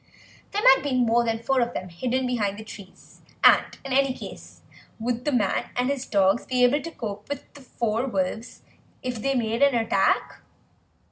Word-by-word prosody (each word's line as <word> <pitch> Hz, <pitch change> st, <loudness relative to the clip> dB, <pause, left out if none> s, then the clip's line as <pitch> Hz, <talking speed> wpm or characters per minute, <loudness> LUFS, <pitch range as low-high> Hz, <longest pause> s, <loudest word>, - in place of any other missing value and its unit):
There 415 Hz, +1 st, -2 dB
might 265 Hz, -, +7 dB
be 275 Hz, -2 st, -2 dB
more 240 Hz, -1 st, +3 dB
than 225 Hz, 0 st, -2 dB
four 265 Hz, +1 st, +2 dB
of 240 Hz, 0 st, -2 dB
them 185 Hz, -, -5 dB
hidden 250 Hz, +9 st, -2 dB
behind 210 Hz, -5 st, -1 dB
the 220 Hz, -, -8 dB
trees, 200 Hz, -3 st, -13 dB, 0.2 s
and -, -, +5 dB
in 270 Hz, -, -3 dB
any 270 Hz, -1 st, +2 dB
case -, -, -11 dB, 0.3 s
would 240 Hz, +1 st, -3 dB
the 295 Hz, -, +1 dB
man 215 Hz, -7 st, 0 dB
and 250 Hz, +2 st, +1 dB
his 275 Hz, -2 st, -4 dB
dogs 195 Hz, +1 st, +2 dB
be 250 Hz, -1 st, +1 dB
able 270 Hz, +4 st, +4 dB
to 335 Hz, -, -6 dB
cope 210 Hz, -8 st, -7 dB
with 285 Hz, -1 st, -6 dB
the 285 Hz, -, -13 dB
four 235 Hz, -1 st, -2 dB
wolves 210 Hz, +2 st, -3 dB, 0.4 s
if 250 Hz, -3 st, -4 dB
they 275 Hz, +2 st, 0 dB
made 230 Hz, -1 st, -1 dB
an 280 Hz, -2 st, +5 dB
attack? 225 Hz, -1 st, +1 dB
245 Hz, 190 wpm, -25 LUFS, 220-265 Hz, 0.4 s, might